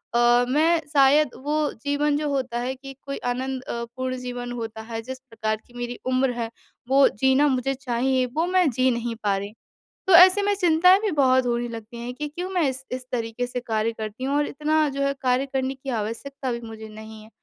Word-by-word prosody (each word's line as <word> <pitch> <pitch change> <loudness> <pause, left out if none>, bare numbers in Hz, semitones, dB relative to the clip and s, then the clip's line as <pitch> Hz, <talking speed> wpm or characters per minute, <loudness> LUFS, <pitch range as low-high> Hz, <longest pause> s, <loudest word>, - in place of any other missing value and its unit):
अ, 240 +1 +5
मैं 320 +4 +3
शायद 285 +1 +5 0.2
वो 300 0 +1
जीवन 285 +1 +1
जो 300 0 -1
होता 255 -4 -2
है 250 +2 -2
कि 270 +1 -10
कोई 275 0 -5
आनंदपूर्ण 255 0 -4
जीवन 245 -1 -5
होता 225 -2 -5
है 225 0 -6
जिस 260 +3 -7
प्रकार 225 -4 -3
की 240 - -21
मेरी 245 0 -5
उम्र 255 0 +2
है, 230 -1 -2 0.4
वो 270 +1 +6
जीना 265 +7 +3
मुझे 265 -1 0
चाहिए 260 0 0
वो 325 +2 +2
मैं 365 -3 +3
जी 255 +2 +2
नहीं 235 -1 -3
पा 200 -1 +2
रही। 200 +2 -6 0.5
तो 380 - +4
ऐसे 370 +3 +8
में 410 0 +2
चिंताएँ 360 +1 +5
भी 425 -3 0
बहुत 260 -3 +3
होने 240 0 0
लगती 230 +1 -8
हैं 245 +1 -5
कि 300 +1 -4
क्यों 355 +5 -5
मैं 360 -2 +1
इस 265 0 -7
इस 255 0 -5
तरीक़े 235 0 -2
से 245 0 -4
कार्य 225 -2 -1
करती 220 +3 -6
हूँ? 275 +2 0
और 295 - +1
इतना 305 +1 +1
जो 275 0 -4
है 275 0 +1
कार्य 255 +1 +2
करने 265 -1 -2
की 270 +1 -8
आवश्यकता 245 +4 -3
भी 235 0 -4
मुझे 220 -1 -9
नहीं 220 0 -11
है। 215 - -16
260 Hz, 210 wpm, -24 LUFS, 235-285 Hz, 0.5 s, ऐसे